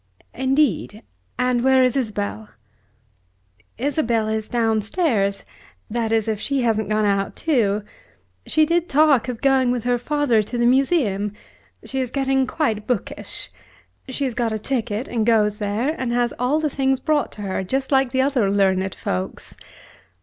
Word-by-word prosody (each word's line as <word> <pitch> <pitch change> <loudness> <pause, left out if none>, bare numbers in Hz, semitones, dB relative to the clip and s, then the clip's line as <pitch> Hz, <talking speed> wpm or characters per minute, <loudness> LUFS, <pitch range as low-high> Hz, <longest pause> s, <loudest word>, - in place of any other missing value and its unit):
"Indeed! 260 - 0 0.3
and 250 -1 +1
where 265 0 +5
is 255 0 +2
Isabel?" 215 -3 -3 1.3
"Isabel 235 -4 0
is 220 0 -2
downstairs, 220 - 0 0.5
that 230 -1 -1
is 225 -1 +1
if 215 -2 -1
she 280 +2 -1
hasn't 220 -2 0
gone 215 0 +1
out 200 -1 0
too. 215 -10 +1 0.6
She 310 - +3
did 340 +2 0
talk 285 -4 +4
of 245 -3 -5
going 265 -2 +3
with 245 -2 -1
her 245 0 +1
father 285 -4 +1
to 225 +4 -5
the 240 - +2
Museum. 240 - +2 0.5
She 265 - -4
is 255 -2 -1
getting 270 0 +1
quite 220 -9 -1
bookish. 245 -6 -4 0.6
She 260 +2 -3
has 260 -3 -1
got 235 -1 -1
a 220 - -1
ticket, 225 -1 -2
and 230 -2 -1
goes 210 -2 +2
there, 215 +8 -1
and 255 -5 -3
has 240 0 +1
all 255 +5 +1
the 310 - 0
things 270 -2 0
brought 295 0 0
to 210 - -8
her 190 -1 -2
just 265 +8 -2
like 270 -2 +3
the 260 0 +2
other 260 -7 +1
learned 190 -1 +1
folks." 90 0 -4
240 Hz, 160 wpm, -22 LUFS, 215-270 Hz, 1.3 s, where